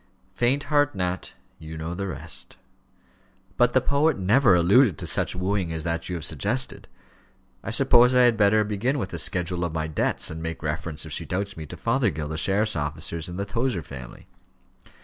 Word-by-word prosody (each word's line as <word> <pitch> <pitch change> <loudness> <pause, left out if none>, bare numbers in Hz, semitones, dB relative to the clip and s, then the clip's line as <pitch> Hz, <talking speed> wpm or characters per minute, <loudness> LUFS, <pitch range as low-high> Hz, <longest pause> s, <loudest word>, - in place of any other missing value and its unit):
"Faint 125 +8 +1
heart, 145 -4 +1
Nat 90 -1 -3 0.3
you 80 0 -8
know 80 +2 -4
the 100 +2 -4
rest." 90 - -7 1.0
"But 120 -1 +3
the 130 - +4
poet 140 +4 +2
never 100 +2 +4
alluded 95 - +4
to - - -6
such - - 0
wooing 90 -1 -1
as 80 -1 -3
that 85 +1 -3
you 90 - -3
have 80 -2 -4
suggested. 120 - -1 0.8
I - - -5
suppose 125 +2 +5
I 125 - +6
had 120 -2 +4
better 105 0 +4
begin 105 +7 -1
with 100 -8 -4
a 85 - -3
schedule 90 +1 -1
of 85 -2 -3
my 80 -1 -1
debts, 80 0 -1
and 80 0 -6
make 80 0 -5
reference, 80 -1 -4
if - - -9
she - - -2
doubts 100 +2 -3
me, 80 -1 -8
to 90 - -9
Fothergill, 100 - 0
the 80 - -4
sheriff's 105 +4 +2
officers, 75 +2 -3
and 90 - -7
the 100 - -2
Tozer 115 -3 -2
family." 65 -4 -10
95 Hz, 190 wpm, -25 LUFS, 80-120 Hz, 1.0 s, I